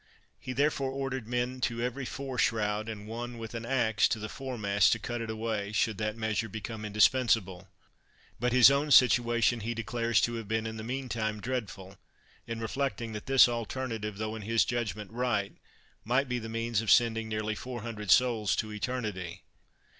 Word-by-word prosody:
He 130 - -6
therefore 140 0 +1
ordered 135 -3 -4
men 125 +1 -2
to 120 -1 -1
every 125 +2 -3
fore 130 -1 -5
shroud, 105 -1 +1
and 105 -2 -7
one 120 +2 -5
with 115 0 -7
an 115 0 -5
axe 110 -6 +2
to - - -1
the 110 0 -6
foremast 110 -8 +1
to - - -1
cut 120 -1 -4
it 115 - -5
away 110 -2 -3
should 110 -1 +1
that 110 +1 -2
measure 110 0 -1
become 110 0 -6
indispensable. 105 -3 +2 0.7
But 125 0 +1
his 130 +1 +8
own 140 +2 +1
situation 120 -2 +5
he 115 +2 -3
declares 115 0 0
to 120 - +1
have 115 -3 -6
been 110 +1 -1
in 110 0 -5
the 110 - -6
meantime 115 -4 -3
dreadful; 100 -5 -5 0.5
in 115 0 -4
reflecting 115 -1 -2
that 105 +3 -7
this 135 -1 +7
alternative, 115 -3 -4
though 110 +1 -3
in 110 - -6
his 115 +2 +2
judgment 110 -4 -3
right, 115 -4 -1 0.5
might 130 +4 +1
be 125 0 -1
the 115 -1 -7
means 115 -1 -1
of 110 - -4
sending 115 -2 +4
nearly 110 0 -2
four 125 +1 -6
hundred 105 -4 -6
souls 115 -2 +4
to 110 -1 -3
eternity. 105 -6 -4
115 Hz, 180 wpm, -30 LUFS, 110-125 Hz, 0.7 s, his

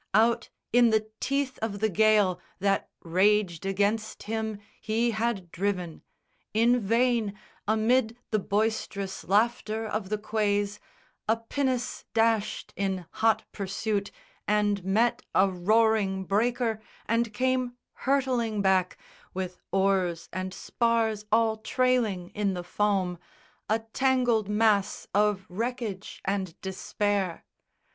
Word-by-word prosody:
Out 230 +1 +3 0.2
in 240 -1 +6
the 215 0 +1
teeth 275 -1 -1
of 210 -2 -3
the 220 - +2
gale 210 -2 +3 0.2
That 195 0 0
raged 190 0 +2
against 205 +3 0
him 220 0 -3 0.2
he 225 +2 +1
had 215 -6 -2
driven. 180 -3 -2 0.5
In 235 +3 +4
vain, 230 -1 +1 0.3
Amid 225 +2 +2
the 215 - +2
boisterous 200 -1 -1
laughter 220 +1 +1
of 215 -3 -3
the 215 - 0
quays, 205 -1 0 0.5
A 225 - +4
pinnace 250 +2 -2
dashed 225 -2 +1
in 190 -2 -2
hot 220 -1 +2
pursuit 200 +1 -2 0.4
and 205 -2 +2
met 220 +6 +2
A 195 - +6
roaring 195 0 +2
breaker 225 +2 +1 0.2
and 230 0 +1
came 255 +1 0 0.2
hurtling 250 -6 0
back 185 -1 +2 0.4
With 185 -1 -4
oars 190 -3 +1
and 185 +1 -3
spars 225 0 0
all 220 0 +3
trailing 220 -6 +1
in 200 -2 -1
the 180 - -4
foam, 185 -2 0 0.5
A 220 - +3
tangled 235 -1 +1
mass 210 -2 +2
of 205 -1 +2
wreckage 225 -1 -4
and 190 -3 -2
despair. 190 -1 -2
215 Hz, 115 wpm, -28 LUFS, 195-230 Hz, 0.5 s, in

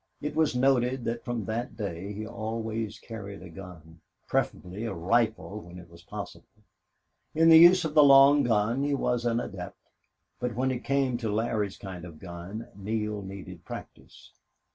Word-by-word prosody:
It 150 - -4
was 155 -4 +2
noted 125 -1 +2
that 115 0 -3
from 120 -4 -3
that 115 +4 -4
day 100 -2 -4
he 105 +1 -5
always 110 0 -4
carried 100 -4 -9
a 90 - -11
gun, 80 -3 -12 0.3
preferably 95 +5 -2
a 100 - -3
rifle 110 +3 0
when 90 -1 -12
it 85 -1 -13
was 85 0 -15
possible. 90 - -10 0.7
In 165 +1 +5
the 160 0 +10
use 175 +1 +7
of 155 - -3
the 150 - +7
long 140 +1 +8
gun 115 +2 +1
he 145 0 +1
was 125 -3 -1
an 115 0 +1
adept, 90 -5 -6 0.6
but 125 -2 -2
when 130 +2 +1
it 125 -1 -4
came 135 -3 +1
to 115 -3 -3
Larry's 105 -2 -1
kind 95 -3 -8
of 85 -2 -9
a - - -15
gun 90 +6 -8
Neale 105 +1 -3
needed 95 0 -9
practice. - - -11
110 Hz, 175 wpm, -28 LUFS, 95-125 Hz, 0.7 s, the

